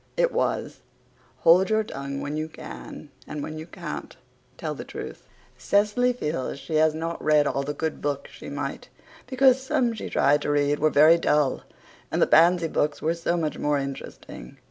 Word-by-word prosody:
It -, -, +3 dB
was, -, -, -1 dB, 0.6 s
"Hold 180 Hz, +4 st, +5 dB
your 220 Hz, 0 st, +2 dB
tongue 140 Hz, -7 st, -6 dB
when 145 Hz, +1 st, -4 dB
you 155 Hz, +1 st, -3 dB
can, 60 Hz, -, -10 dB, 0.2 s
and 150 Hz, -1 st, -5 dB
when 155 Hz, 0 st, -6 dB
you 160 Hz, -, -8 dB
can't -, -, -7 dB, 0.4 s
tell -, -, -3 dB
the -, -, -7 dB
truth." -, -, -9 dB, 0.3 s
Cecily 210 Hz, +5 st, +2 dB
feels 150 Hz, -, -3 dB
she 155 Hz, +2 st, -3 dB
has 155 Hz, 0 st, +3 dB
not 165 Hz, +1 st, -4 dB
read 150 Hz, -1 st, +4 dB
all 140 Hz, -, 0 dB
the 145 Hz, +1 st, -4 dB
good 160 Hz, +1 st, -3 dB
books 145 Hz, -1 st, -3 dB
she -, -, -10 dB
might, -, -, -5 dB, 0.4 s
because 260 Hz, 0 st, +4 dB
some 260 Hz, -3 st, 0 dB
she 220 Hz, -, -6 dB
tried 145 Hz, +1 st, +3 dB
to -, -, -3 dB
read 145 Hz, 0 st, +1 dB
were 155 Hz, -, +3 dB
very 155 Hz, +4 st, +6 dB
dull 150 Hz, -4 st, +1 dB, 0.5 s
and -, -, -1 dB
the -, -, +5 dB
Pansy 170 Hz, +1 st, +5 dB
books 150 Hz, -1 st, -1 dB
were 160 Hz, +2 st, 0 dB
so 170 Hz, +1 st, -1 dB
much 155 Hz, -3 st, -2 dB
more 150 Hz, 0 st, +1 dB
interesting. 135 Hz, -, -7 dB
155 Hz, 185 wpm, -25 LUFS, 145-180 Hz, 0.6 s, very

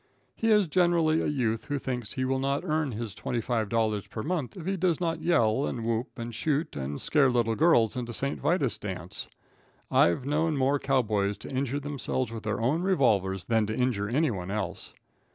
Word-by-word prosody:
He 225 Hz, -, 0 dB
is 210 Hz, -4 st, +5 dB
generally 170 Hz, -1 st, +3 dB
a -, -, -1 dB
youth 120 Hz, -4 st, -1 dB
who 145 Hz, -1 st, -2 dB
thinks 125 Hz, -5 st, -4 dB
he 130 Hz, -1 st, -1 dB
will 130 Hz, 0 st, 0 dB
not 140 Hz, +3 st, 0 dB
earn 155 Hz, -4 st, 0 dB
his 110 Hz, -2 st, -4 dB
twenty 120 Hz, +2 st, -3 dB
five 115 Hz, -2 st, -1 dB
dollars 110 Hz, -3 st, 0 dB
per 110 Hz, -, -5 dB
month 160 Hz, -, -3 dB
if 170 Hz, -, -7 dB
he 195 Hz, +1 st, 0 dB
does 175 Hz, -3 st, +1 dB
not 165 Hz, -2 st, -1 dB
yell, 135 Hz, -6 st, +2 dB
and 115 Hz, -2 st, -4 dB
whoop, 115 Hz, +1 st, 0 dB
and 115 Hz, 0 st, -5 dB
shoot, 150 Hz, +6 st, -1 dB
and 70 Hz, +1 st, -4 dB
scare 145 Hz, -4 st, +3 dB
little 120 Hz, -2 st, +1 dB
girls 120 Hz, -6 st, +4 dB
into 120 Hz, -2 st, -4 dB
St. 140 Hz, +4 st, -2 dB
Vitus's 155 Hz, -8 st, +1 dB
dance. 90 Hz, -4 st, -6 dB, 0.6 s
I've 85 Hz, +10 st, +3 dB
known 155 Hz, +2 st, +1 dB
more 135 Hz, +2 st, +2 dB
cow 135 Hz, -2 st, +2 dB
boys 105 Hz, -2 st, 0 dB
to -, -, -9 dB
injure 135 Hz, +1 st, -1 dB
themselves 135 Hz, -4 st, -2 dB
with 115 Hz, -1 st, -6 dB
their 110 Hz, 0 st, -2 dB
own 135 Hz, +9 st, +1 dB
revolvers 110 Hz, -, +2 dB
than 110 Hz, -2 st, +2 dB
to 110 Hz, -, -2 dB
injure 120 Hz, -5 st, 0 dB
anyone 120 Hz, -, 0 dB
else. 95 Hz, -3 st, -4 dB
130 Hz, 200 wpm, -28 LUFS, 110-150 Hz, 0.6 s, is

